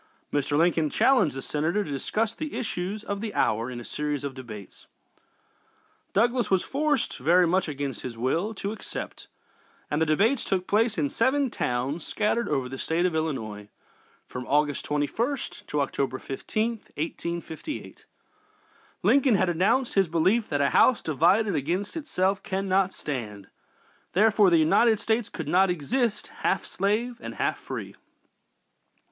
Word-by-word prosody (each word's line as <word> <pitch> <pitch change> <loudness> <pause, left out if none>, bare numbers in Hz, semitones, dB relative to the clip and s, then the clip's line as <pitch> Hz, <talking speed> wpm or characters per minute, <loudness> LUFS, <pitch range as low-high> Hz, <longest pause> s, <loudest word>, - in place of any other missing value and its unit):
Mr. 145 0 +1
Lincoln 165 -1 +3
challenged 225 - +3
the 135 - -5
Senator 165 +7 0
to 150 - -7
discuss 215 +11 -1
the 310 +4 -5
issues 205 -1 -3
of 200 -1 -4
the 220 -2 -4
hour 115 +3 +1
in 125 -1 -6
a 120 - -9
series 150 -1 -3
of 140 -1 -3
debates. 110 -7 -10 1.3
Douglas 240 +3 +2
was 190 -2 +3
forced, 290 -1 0
very 175 +7 +4
much 185 +2 +1
against 140 -4 -4
his 120 -3 -6
will, 165 - 0
to 200 +1 -3
accept, 220 - -7 0.6
and 150 +2 0
the 160 - +3
debates 220 - +2
took 185 -2 -1
place 220 +2 +2
in 150 -3 +1
seven 265 +2 +2
towns 130 +6 -2
scattered 225 +2 0
over 135 -4 0
the 135 +1 -7
State 165 +2 0
of 180 - +1
Illinois, 110 -10 -3 0.6
from 125 -1 -7
August 145 0 +1
21st 225 - -2
to 150 - 0
October 135 -1 -1
15th, 215 - -3
1858. 170 - -5 1.0
Lincoln 270 -4 +4
had 185 -2 +2
announced 215 +9 +2
his 195 -2 +3
belief 185 +8 +2
that 145 -2 0
"a 140 - +2
house 255 - +4
divided 175 +8 +3
against 175 +8 -2
itself 195 - 0
cannot 190 0 +1
stand;" 105 - -6 0.6
therefore 210 +1 +5
the 170 - +5
United 215 +8 +4
States 225 0 0
could - - -6
not 190 +1 +4
long 180 - +1
exist 230 - -1
"half - - 0
slave 220 +5 -1
and - - -7
half - - -1
free." - - -6
180 Hz, 150 wpm, -26 LUFS, 145-220 Hz, 1.3 s, therefore